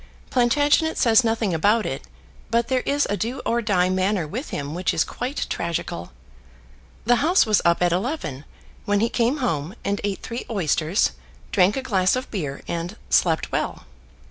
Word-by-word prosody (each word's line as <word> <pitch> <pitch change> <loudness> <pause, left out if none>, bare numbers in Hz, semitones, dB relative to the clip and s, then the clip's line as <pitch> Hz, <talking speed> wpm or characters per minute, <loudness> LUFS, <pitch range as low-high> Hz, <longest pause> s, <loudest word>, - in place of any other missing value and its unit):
Plantagenet 290 +6 +3
says 230 +1 +5
nothing 225 -4 0
about 210 +7 +2
it, 135 - -3 0.5
but 235 +1 +1
there 260 -1 +2
is 285 +1 +2
a 205 - 0
do 235 +6 -3
or 235 +1 +1
die 190 -5 +2
manner 185 -2 0
with 245 - -5
him 145 +1 -4
which 180 +2 -1
is 160 - +3
quite 255 +4 -4
tragical. 160 - -3 0.9
The 240 +1 +4
House 335 +8 +4
was 215 -3 +3
up 170 +1 +3
at 175 - +3
eleven, 175 - -2 0.4
when 205 -1 +2
he 230 +2 +2
came 240 +5 +1
home 160 -1 -2
and 200 0 -1
eat 200 -1 -3
three 235 0 -5
oysters, 175 -2 +1 0.4
drank 195 +2 +3
a 265 - -2
glass 190 -6 +2
of 255 +1 -4
beer, 145 -9 -4
and 170 +5 -4
slept 165 -3 +2
well. - - -2
205 Hz, 170 wpm, -23 LUFS, 175-240 Hz, 0.9 s, says